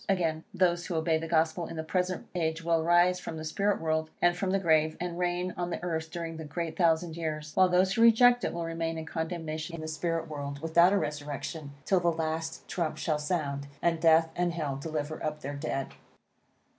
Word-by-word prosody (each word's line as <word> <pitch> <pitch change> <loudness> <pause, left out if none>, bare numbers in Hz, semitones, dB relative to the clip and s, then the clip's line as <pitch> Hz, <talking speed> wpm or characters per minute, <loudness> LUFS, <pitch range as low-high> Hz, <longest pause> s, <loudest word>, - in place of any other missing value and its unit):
Again, 165 -4 0
those 175 -1 +1
who 175 - -3
obey 160 0 +2
the 165 - -5
Gospel 160 +1 +1
in - - -7
the 160 - -3
present 180 +2 -1
age 165 -2 -1
will 165 -1 +2
rise 175 +2 +4
from 165 - -6
the 155 - -6
spirit 200 +5 0
world, 160 0 0
and 175 0 +3
from 185 +1 -2
the 195 - +2
grave, 160 -4 +2
and 175 -1 -4
reign 180 0 -1
on 175 0 -2
the 175 - -4
earth 160 -2 -2
during 165 -1 -5
the 160 - -6
great 160 +1 -4
thousand 165 -1 +2
years; 155 -2 -4
while 185 -1 +5
those 185 +2 +3
who 225 - +1
reject 240 +1 +6
it - - 0
will 170 0 -3
remain 165 0 -2
in 160 - -5
condemnation 160 -1 -4
in 165 - -7
the 155 - -5
spirit 165 +1 -2
world, 140 -2 -5
without 170 +3 +4
a 200 - +3
resurrection, 145 -1 -4
till 190 - +3
the 175 - -1
last 160 0 -3
trump 170 -4 -2
shall 155 -2 0
sound, 145 -3 -2
and 165 0 +1
death 165 0 +5
and 175 -1 0
hell 150 -5 -2
deliver 155 +1 -4
up 150 0 -3
their 145 0 -4
dead. 140 -2 -3
165 Hz, 215 wpm, -29 LUFS, 155-175 Hz, -, reject